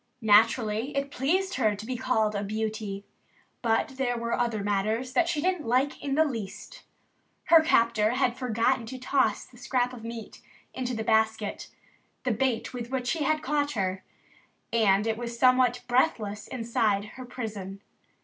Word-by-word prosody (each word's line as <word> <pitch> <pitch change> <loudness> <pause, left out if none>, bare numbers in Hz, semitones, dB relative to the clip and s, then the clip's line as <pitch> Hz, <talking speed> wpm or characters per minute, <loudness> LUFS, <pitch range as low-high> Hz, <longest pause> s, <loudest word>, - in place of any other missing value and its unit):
Naturally, 220 +3 +3
it 275 0 -2
pleased 370 +10 0
her 215 -1 +2
to 205 +2 -8
be 255 +2 -3
called 225 -4 +1
a 200 - -2
beauty. 215 -1 -4 0.6
But 235 +3 0
there 245 -3 0
were 235 0 -2
other 230 -4 -1
matters 215 +5 -1
that 345 +3 +2
she 305 -4 0
didn't 360 -6 -1
like 255 +4 +1
in 275 -1 -1
the 315 +1 +4
least. 245 - -6 0.6
Her 330 -1 +7
captor 230 -7 +3
had 255 -2 +1
forgotten 245 -1 0
to 260 +3 -6
toss 260 +1 +1
the 245 - -18
scrap 245 0 0
of 235 -3 -10
meat 230 -1 -8 0.3
into 250 -1 -3
the 220 - -3
basket 220 -1 0 0.6
the 255 - +1
bait 235 +1 -1
with 240 -1 -5
which 255 -2 -1
he 315 -4 -1
had 310 +1 +1
caught 290 +1 0
her. 190 -3 -2 0.7
And 210 -3 +3
it 220 -1 0
was 235 0 -5
somewhat 255 -1 +4
breathless 225 -5 0
inside 225 -4 0
her 255 - -10
prison. 205 -6 -6
235 Hz, 165 wpm, -27 LUFS, 220-260 Hz, 0.7 s, Her